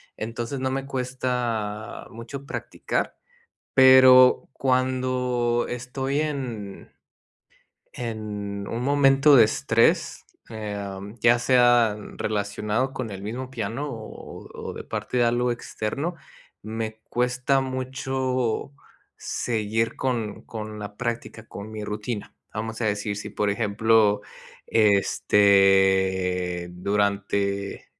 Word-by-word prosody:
Entonces 115 +4 -4
no 130 0 0
me 135 0 -2
cuesta 125 -5 -3
mucho 120 +4 -8
practicar, - - -3 0.6
pero, 130 -1 +7
cuando 125 -2 0
estoy 130 +3 -2
en 125 -10 -5 1.0
en 105 -4 -5
un 115 +2 -3
momento 140 +1 +5
de 115 -4 +8
estrés, 115 0 +1 0.2
eh, 110 -2 -5
am, 100 +2 -7
ya 120 +2 +5
sea 120 -3 +4 0.2
relacionado 105 +4 -1
con 125 -3 -4
el 95 -1 -7
mismo 120 +6 -5
piano, 120 +3 -4
o 115 -4 -9
o - - -9
o - - -5
de - - -7
parte 125 - -4
de 120 - +4
algo 120 +1 +1
externo, 140 +8 -3 0.5
me 110 0 -5
cuesta 125 +2 +1
mucho 130 -1 -2 0.5
seguir 115 -1 -1
con 120 -5 -2
con 110 -1 -7
la 105 -1 -7
práctica, 115 -2 -4
con 100 +2 -8
mi 110 -1 -6
rutina. 105 +1 -5 0.2
Vamos 110 +1 -4
a - - +1
decir 105 0 -1
si, 105 - -6
por 105 - -1
ejemplo, 105 0 +2 0.4
este, 95 -3 +3
durante 100 +1 -1
115 Hz, 110 wpm, -25 LUFS, 105-130 Hz, 1.0 s, de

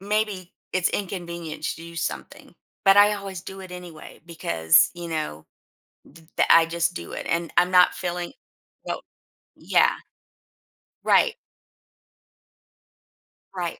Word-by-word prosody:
maybe 205 -2 -2 0.2
it's 185 -1 +2
inconvenient 170 -5 -5
to - - -2
do 170 0 -11
something, - - -5 0.3
but 195 0 +6
I 205 +1 +7
always 195 -3 -6
do 190 0 -9
it 185 - -10
anyway 175 -3 -10
because, 80 - +3
you 175 -1 -7
know, 155 - -4 0.7
th 160 -1 -17
the - - +4
I 165 0 +7
just 170 +1 -1
do - - -7
it - - -6
and 170 -1 -1
I'm 180 +1 +4
not 180 -1 +5
feeling 175 -1 -4 0.5
no - - -3 0.6
Yeah. - - +2 1.1
Right. 465 - +4 2.2
Right. 175 -2 -4
175 Hz, 125 wpm, -24 LUFS, 165-190 Hz, 2.2 s, I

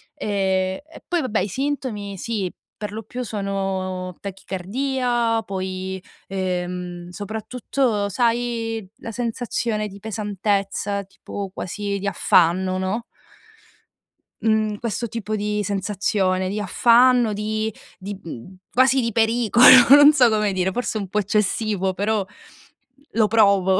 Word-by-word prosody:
E 190 0 -1
e 315 +1 -15
poi, 350 -1 0
vabbè, 240 -6 0
i 185 - 0
sintomi 225 -5 -3
sì, 200 -3 -3 0.3
perlopiù 215 +4 -6
sono 195 -3 -3
tachicardia, 230 +4 -1
poi, 190 -1 -4 0.2
ehm, 180 -2 -3
soprattutto, 220 +2 -2
sai, 230 0 -1
la 230 - -7
sensazione 230 -2 -2
di 200 0 -11
pesantezza, 205 -1 -2
tipo 195 0 -7
quasi 200 +2 -4
di 200 - -3
affanno, 185 0 +3
no 190 +5 -2 1.4
mhmm, 215 -1 +1
questo 235 0 -3
tipo 215 -1 -3
di 210 0 -1
sensazione 195 -1 0
di 205 +3 -2
affanno 240 +3 +4
di 215 +1 -2 0.2
di 200 +1 -7
mhmm, 165 +4 -9 0.2
quasi 260 +1 +4
di 230 -1 -1
pericolo, 230 +1 +3 0.2
non 290 +2 +9
so 255 -5 +5
come 210 -2 +1
dire, 185 0 0
forse 245 +1 -2
un 200 -3 -4
po' 210 - 0
eccessivo, 205 -1 0
però 205 +1 0 0.9
lo 220 -1 +3
provo, 200 -4 +4
205 Hz, 120 wpm, -22 LUFS, 190-230 Hz, 1.4 s, non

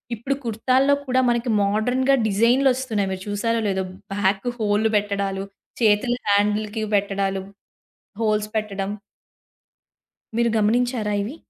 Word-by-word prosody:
ఇప్పుడు 255 +5 -2
కుర్తాల్లో 255 +5 +2
కూడా 255 -1 +1
మనకి 240 0 0
మోడర్న్‌గా 245 +7 +2
డిజైన్‌లొస్తున్నాయి. 235 -1 +2
మీరు 190 0 -5
చూసారో 230 +3 0
లేదో? 190 -1 0 0.3
బ్యాక్కు 195 +3 0
హోల్లు 215 +1 +1
పెట్టడాలు, 200 -1 -2 0.4
చేతులు 225 +3 +3
హ్యాండిల్‌కి 210 +2 +1
పెట్టడాలు, 195 -1 0 0.8
హోల్స్ 210 -1 +1
పెట్టడం. 200 -2 -2 1.5
మీరు 235 0 +3
గమనించారా 225 0 +1
ఇవి? 250 +9 -6
215 Hz, 105 wpm, -22 LUFS, 200-240 Hz, 1.5 s, చేతులు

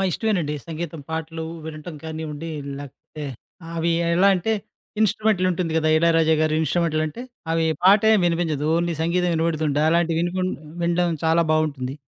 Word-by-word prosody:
ఇష్టమేనండి. 180 -7 0
సంగీతం, 165 -1 -5
పాటలు 160 0 -4 0.2
వినటం 155 +1 -7
కానివ్వండి, 160 0 -5 0.3
లేకపోతే 145 +2 -9 0.5
అవి 165 +1 +1 0.2
ఎలా 190 +3 +5
అంటే 190 +5 0 0.5
ఇన్‌స్ట్రుమెంట్లుంటుంది 185 -5 +1
కదా! 155 0 +1
ఇళయరాజా 165 -1 +4
గారి 155 0 +1
ఇన్‌స్ట్రుమెంట్లుంటే, 155 - -1 0.3
అవి 165 0 +2 0.2
పాట 200 +2 +7
ఏమి 205 - +3
వినిపించదు. 165 -4 0
ఓన్లీ 170 0 0
సంగీతం 175 +2 +1
వినపడుతుంటే 160 -3 0
అలాంటివి 170 0 +2
వినకుం 185 +2 -1 0.3
వినడం 170 0 +1
చాలా 165 +1 +4
బావుంటుంది. 140 -5 -1
165 Hz, 130 wpm, -23 LUFS, 155-175 Hz, 0.5 s, పాట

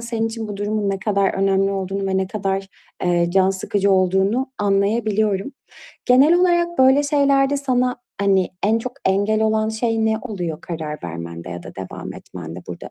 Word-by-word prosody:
senin 230 -1 -2
için 225 -1 -5
bu 205 - -5
durumun 205 0 -1
ne 195 - -2
kadar 200 -1 +1
önemli 195 0 +2
olduğunu 195 0 -3
ve 190 0 0
ne 190 0 0
kadar, 195 -1 -2 0.4
eee, 175 -1 +2
can 190 +1 +3
sıkıcı 195 +1 0
olduğunu 190 +6 +2
anlayabiliyorum. 205 +2 +1 0.5
Genel 270 +7 +6
olarak 345 -1 +2
böyle 265 +2 +5
şeylerde 280 -1 +2
sana, 255 -2 0 0.2
hani, 195 -2 +3
en 220 +3 +3
çok 250 +2 -5
engel 205 +3 +2
olan 220 0 +1
şey 225 0 0
ne 220 0 +1
oluyor 175 -9 -4
karar 155 -3 -5
vermende 85 0 -7
ya 85 0 -6
da - - -10
devam 95 -1 -7
etmende 85 0 -9
burada? 90 - -8
200 Hz, 165 wpm, -21 LUFS, 190-230 Hz, 0.5 s, Genel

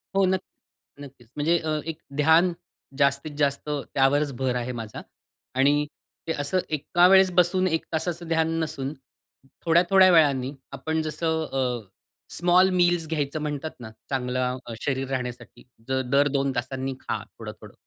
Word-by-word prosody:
हो, 195 0 +4
नक्क 185 0 0 0.6
नक्कीच. 135 -4 -13
म्हणजे 160 +4 +2
अ, 155 -1 -2
एक 160 -1 -4 0.2
ध्यान 160 +4 +5 0.5
जास्तीत 140 +1 +1
जास्त 140 0 0
त्यावरच 145 0 +1
भर 130 -1 0
आहे 125 0 -2
माझा. 110 -1 -7 0.5
आणि 145 +3 +3 0.4
ते - - 0
असं 145 +6 0
एका 165 +4 +3
वेळेस 190 0 +6
बसून 180 +1 +3
1 165 -2 -1
तासाचं 170 +1 -2
ध्यान 160 0 +1
नसून 140 -3 -3 0.7
थोड्या-थोड्या 180 +3 +5
वेळानी 140 -5 +3 0.2
आपण 160 0 -2
जसं 160 +1 -1
अ, 125 -5 -1 0.5
स्मॉल 180 +2 +4
मील्स 175 -2 +2
घ्यायचं 150 -1 -2
म्हणतात 150 +1 -3
ना, 115 -2 -8 0.2
चांगलं 125 -1 -1 0.2
शरीर 135 -1 -1
राहण्यासाठी 125 -2 -5 0.2
दर 130 +2 +2
2 140 -1 +1
तासांनी 130 +2 -3
खा - - -4
थोडं-थोडं. - - -11
150 Hz, 140 wpm, -25 LUFS, 135-165 Hz, 0.7 s, वेळेस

